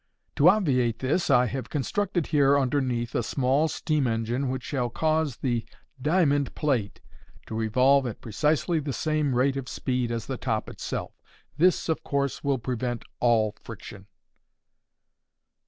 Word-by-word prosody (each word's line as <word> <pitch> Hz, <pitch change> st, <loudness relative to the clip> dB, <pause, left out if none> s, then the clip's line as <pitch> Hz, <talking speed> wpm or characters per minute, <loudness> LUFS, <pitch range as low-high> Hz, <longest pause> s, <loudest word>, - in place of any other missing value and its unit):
To 150 Hz, +5 st, +7 dB
obviate 130 Hz, -, +2 dB
this, 150 Hz, +7 st, 0 dB
I 125 Hz, -2 st, +5 dB
have 130 Hz, +2 st, -4 dB
constructed 175 Hz, -, -1 dB
here, 140 Hz, -1 st, +4 dB
underneath, 130 Hz, -3 st, 0 dB
a -, -, +1 dB
small 135 Hz, +4 st, +1 dB
steam 155 Hz, -3 st, 0 dB
engine 120 Hz, +4 st, -1 dB
which 130 Hz, -1 st, -3 dB
shall 125 Hz, -4 st, -2 dB
cause 155 Hz, 0 st, 0 dB
the 120 Hz, -4 st, -1 dB, 0.4 s
diamond 145 Hz, -2 st, +2 dB
plate 125 Hz, -9 st, -1 dB, 0.4 s
to -, -, -8 dB
revolve 125 Hz, +5 st, +3 dB
at 115 Hz, -, -6 dB
precisely 150 Hz, -, 0 dB
the 145 Hz, -2 st, -4 dB
same 155 Hz, -3 st, 0 dB
rate 135 Hz, +2 st, +2 dB
of 130 Hz, -2 st, -5 dB
speed 125 Hz, -2 st, -1 dB
as 115 Hz, -1 st, -3 dB
the 130 Hz, -, -4 dB
top 110 Hz, -4 st, -2 dB
itself. -, -, -5 dB, 0.4 s
This, 175 Hz, +5 st, +3 dB
of 160 Hz, -, 0 dB
course, 140 Hz, -1 st, -1 dB
will 140 Hz, -2 st, +1 dB
prevent 120 Hz, -1 st, -3 dB, 0.2 s
all 110 Hz, -3 st, +2 dB
friction." 105 Hz, -3 st, -10 dB
135 Hz, 145 wpm, -26 LUFS, 120-150 Hz, 0.4 s, To